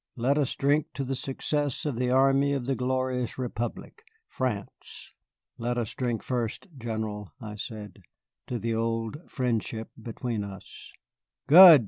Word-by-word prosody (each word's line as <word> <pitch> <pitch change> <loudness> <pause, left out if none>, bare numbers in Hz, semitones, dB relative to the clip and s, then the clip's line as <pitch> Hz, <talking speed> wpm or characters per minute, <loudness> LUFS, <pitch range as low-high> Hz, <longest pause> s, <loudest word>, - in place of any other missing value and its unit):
Let 135 +4 +2
us 140 - +1
drink 145 +2 +3 0.3
success 140 +1 -1
to 150 - 0
the 125 0 0
army 135 +2 +4
of 135 -3 -1
the 135 - +1
glorious 130 -1 0
Republic, 120 - -4 0.3
France." 125 -6 -4 0.5
"Let 120 +1 -1
us 115 -3 -1
drink 120 -3 -1
first, 120 - -2
General," 110 -4 -4
I 110 -4 -6
said, 105 -1 -7 0.5
"to 125 - -2
the 115 0 -1
old 115 +2 -1
friendship 115 -3 -1
between 115 -1 -3
us." 100 -2 -9 0.5
"Good!" 170 -1 +11
125 Hz, 130 wpm, -28 LUFS, 115-135 Hz, 0.5 s, Good